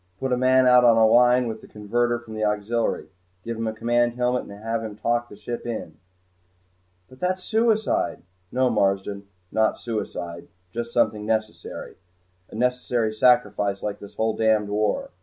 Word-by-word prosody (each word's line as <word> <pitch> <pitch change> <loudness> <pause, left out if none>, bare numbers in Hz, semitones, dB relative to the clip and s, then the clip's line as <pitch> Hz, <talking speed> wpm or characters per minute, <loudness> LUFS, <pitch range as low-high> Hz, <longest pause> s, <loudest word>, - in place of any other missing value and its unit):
"Put 135 -1 -1
a - - +4
man 130 +1 +4
out 125 0 +6
on 115 -2 +6
a 110 - +6
line 125 +2 +5
with 110 -1 -5
the - - -14
converter 120 +3 -1
from 120 -2 -11
the 110 0 -3
auxiliary. 105 +2 -1 0.3
Give 115 0 -4
him 115 0 -3
a - - 0
command 120 +2 +1
helmet 125 0 0
and - - -12
have 115 0 -2
him 110 -2 -6
talk 120 +3 -1
the - - -11
ship 110 +3 -6
in." 110 -9 -5 1.1
"But 130 - -17
that's 185 +1 -1
suicide!" 220 0 +1 0.3
"No, 130 0 +2
Marsden, 100 -1 0 0.2
not 110 0 +2
suicide 90 -7 -5 0.2
just 120 +2 -4
something 110 -3 +1
necessary. 110 -1 -3 0.5
A - - -11
necessary 125 -2 0
sacrifice, 105 -4 +2
like 105 -1 -3
this 100 - -12
whole 110 0 0
damned 110 -2 +2
war! 110 - -1
115 Hz, 170 wpm, -24 LUFS, 105-125 Hz, 1.1 s, out